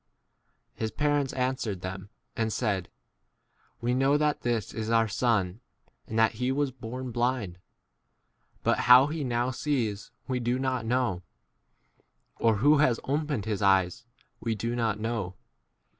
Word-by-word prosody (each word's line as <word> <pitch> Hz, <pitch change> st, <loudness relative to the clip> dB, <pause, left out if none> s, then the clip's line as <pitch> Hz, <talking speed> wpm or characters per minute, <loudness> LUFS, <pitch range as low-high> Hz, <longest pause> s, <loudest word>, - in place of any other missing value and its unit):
His 110 Hz, -, -3 dB
parents 145 Hz, 0 st, 0 dB
answered'them 100 Hz, -7 st, -3 dB, 0.3 s
and 110 Hz, -1 st, 0 dB
said, 105 Hz, -6 st, -1 dB, 0.9 s
We 120 Hz, +1 st, 0 dB
know 135 Hz, +3 st, +3 dB
that 150 Hz, 0 st, 0 dB
this 115 Hz, -4 st, -1 dB
is 110 Hz, 0 st, -4 dB
our 115 Hz, -1 st, +3 dB
son, 105 Hz, -3 st, 0 dB, 0.5 s
and 110 Hz, -, -4 dB
that 110 Hz, 0 st, +5 dB
he 125 Hz, +1 st, +1 dB
was 140 Hz, 0 st, 0 dB
born 125 Hz, 0 st, -7 dB
21 125 Hz, -, -5 dB
blind; 120 Hz, -7 st, -1 dB, 1.1 s
but -, -, +2 dB
how 125 Hz, +2 st, +10 dB
he 155 Hz, +1 st, -3 dB
now 120 Hz, 0 st, 0 dB
sees 120 Hz, -7 st, -2 dB, 0.2 s
we 130 Hz, -2 st, -1 dB
do 120 Hz, +1 st, 0 dB
not 130 Hz, -3 st, -1 dB
know, 120 Hz, -7 st, 0 dB, 1.2 s
or 115 Hz, -1 st, +3 dB
who 145 Hz, +8 st, +4 dB
has 130 Hz, -6 st, +3 dB
opened 145 Hz, -5 st, -1 dB
his 110 Hz, -2 st, -2 dB
eyes 95 Hz, +3 st, +2 dB, 0.3 s
we* 115 Hz, -1 st, -1 dB
do 115 Hz, +3 st, -2 dB
not 110 Hz, -3 st, 0 dB
know. 110 Hz, -5 st, -3 dB
120 Hz, 145 wpm, -28 LUFS, 110-130 Hz, 1.2 s, how